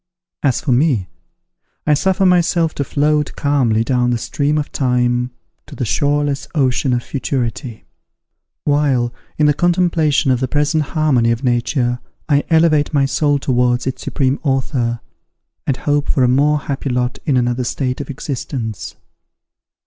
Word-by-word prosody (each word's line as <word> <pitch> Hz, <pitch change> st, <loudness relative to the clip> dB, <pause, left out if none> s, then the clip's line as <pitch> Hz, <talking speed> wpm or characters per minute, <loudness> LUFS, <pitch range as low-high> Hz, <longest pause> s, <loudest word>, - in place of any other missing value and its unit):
As 135 Hz, -4 st, +1 dB
for 155 Hz, -, -1 dB
me, 125 Hz, -, +2 dB, 0.8 s
I 150 Hz, -, +3 dB
suffer 190 Hz, +5 st, +1 dB
myself 170 Hz, -2 st, +2 dB
to 140 Hz, -, -2 dB
float 150 Hz, +2 st, 0 dB
calmly 125 Hz, -6 st, +1 dB
down 125 Hz, 0 st, +1 dB
the 120 Hz, -, +1 dB
stream 145 Hz, +5 st, -1 dB
of 150 Hz, -, -3 dB
time 125 Hz, -1 st, +1 dB, 0.4 s
to 145 Hz, -, -11 dB
the 130 Hz, -, -2 dB
shoreless 145 Hz, +3 st, 0 dB
ocean 130 Hz, -2 st, +1 dB
of 120 Hz, 0 st, -1 dB
futurity; 125 Hz, -3 st, -4 dB, 0.8 s
while, 140 Hz, -5 st, +1 dB, 0.2 s
in 150 Hz, -, +3 dB
the 150 Hz, -, +4 dB
contemplation 170 Hz, -4 st, +2 dB
of 125 Hz, -, +2 dB
the 130 Hz, -, -1 dB
present 150 Hz, +3 st, +1 dB, 0.2 s
harmony 135 Hz, -7 st, +3 dB
of 115 Hz, +3 st, -1 dB
nature, 120 Hz, 0 st, 0 dB, 0.3 s
I 145 Hz, -2 st, +2 dB
elevate 160 Hz, -3 st, +3 dB
my 140 Hz, -1 st, +3 dB
soul 145 Hz, +1 st, +1 dB
towards 125 Hz, -2 st, +1 dB
its 130 Hz, -, -3 dB
supreme 135 Hz, -1 st, 0 dB
Author, 130 Hz, -4 st, -1 dB, 0.7 s
and 135 Hz, -, +1 dB
hope 145 Hz, 0 st, 0 dB
for 130 Hz, -, +2 dB
a -, -, +4 dB
more 145 Hz, +4 st, +3 dB
happy 140 Hz, 0 st, -4 dB
lot 125 Hz, 0 st, -1 dB
in 140 Hz, -4 st, +3 dB
another 125 Hz, 0 st, 0 dB
state 125 Hz, +2 st, -2 dB
of 145 Hz, -, -8 dB
existence. 130 Hz, -5 st, -5 dB
135 Hz, 150 wpm, -18 LUFS, 125-150 Hz, 0.8 s, the